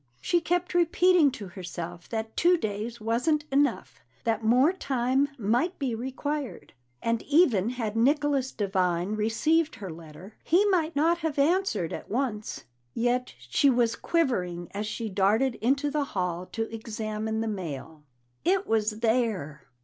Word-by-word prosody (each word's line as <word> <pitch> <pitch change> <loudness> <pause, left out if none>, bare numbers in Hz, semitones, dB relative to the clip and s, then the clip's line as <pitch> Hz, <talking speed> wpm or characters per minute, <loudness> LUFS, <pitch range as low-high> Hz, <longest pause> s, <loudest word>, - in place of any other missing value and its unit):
She 345 - +1
kept 355 +2 -1
repeating 350 -2 +4
to 205 -7 -7
herself 175 -1 -7
that 220 -1 -4
two 355 +1 +4
days 220 -1 -4
wasn't 250 +8 0
enough, 285 +1 +1 0.2
that 225 -2 0
more 250 +9 +4
time 270 -4 0
might 245 - 0
be 265 -4 -2
required, 265 +4 -4 0.3
that 230 -1 0
even 270 - +3
had 230 -4 -3
Nicholas 275 +2 +2
Devine 185 -2 0
received 305 +10 +1
her 195 -4 -7
letter, 160 +4 -11
he 365 +5 +4
might 330 -4 +1
not 330 +4 +3
have 320 -4 -2
answered 325 - +1
at - - -7
once. 225 -3 -2 0.3
Yet 245 +2 0
she 125 - +2
was 240 -3 +2
quivering 180 - -1
as 205 +1 -4
she 225 +1 -4
darted 210 +6 +2
into 275 +5 +1
the 295 -1 0
hall 180 -5 -3
to 225 - -3
examine 220 0 -3
the 225 - -2
mail. 160 -6 -5 0.4
It 380 +2 +2
was 215 0 0
there! 220 - 0
230 Hz, 145 wpm, -27 LUFS, 205-290 Hz, 0.4 s, repeating